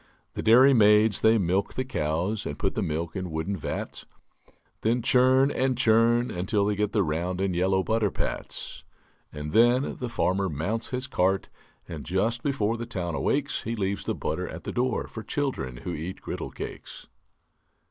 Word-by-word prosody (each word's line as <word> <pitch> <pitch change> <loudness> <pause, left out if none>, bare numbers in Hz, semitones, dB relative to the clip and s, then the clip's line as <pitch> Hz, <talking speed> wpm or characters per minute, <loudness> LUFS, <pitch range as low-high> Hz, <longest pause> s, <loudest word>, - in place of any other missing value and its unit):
The - - -4
dairy 130 +5 +6
maids 105 -2 +5
they 110 +1 +5
milk 95 +1 0
the 130 - -2
cows 90 0 -2
And - - -5
put - - -1
the - - -2
milk 80 +3 -3
in 95 -2 -3
wooden 80 +5 -2
vats; 85 - -5 0.8
Then 115 +2 +1
churn 130 +3 +4
and 130 -1 0
churn 120 0 +3
until 95 +3 0
they 105 - +1
get 105 0 0
The 105 -3 +2
round 85 +3 -2
and 95 -2 0
yellow 95 +2 +2
butter 110 -1 +1
pats. - - -5 0.5
And 75 +1 -6
then 120 - +3
the 125 - -3
farmer 95 -3 0
mounts 95 +10 -3
his 130 0 -2
cart, 95 -6 0 0.4
And 80 -4 -7
just 110 - 0
before 115 -5 0
the 115 0 -5
town 90 -7 -3
awakes 145 - 0
He 115 - -3
leaves 100 -2 -2
the - - -1
butter - - -3
at - - -8
the - - -4
door 125 +1 0
For 110 - -8
children 110 - -3
who 90 +8 -5
eat 85 +4 -5
griddle - - -5
cakes. - - -8
105 Hz, 180 wpm, -26 LUFS, 90-120 Hz, 0.8 s, dairy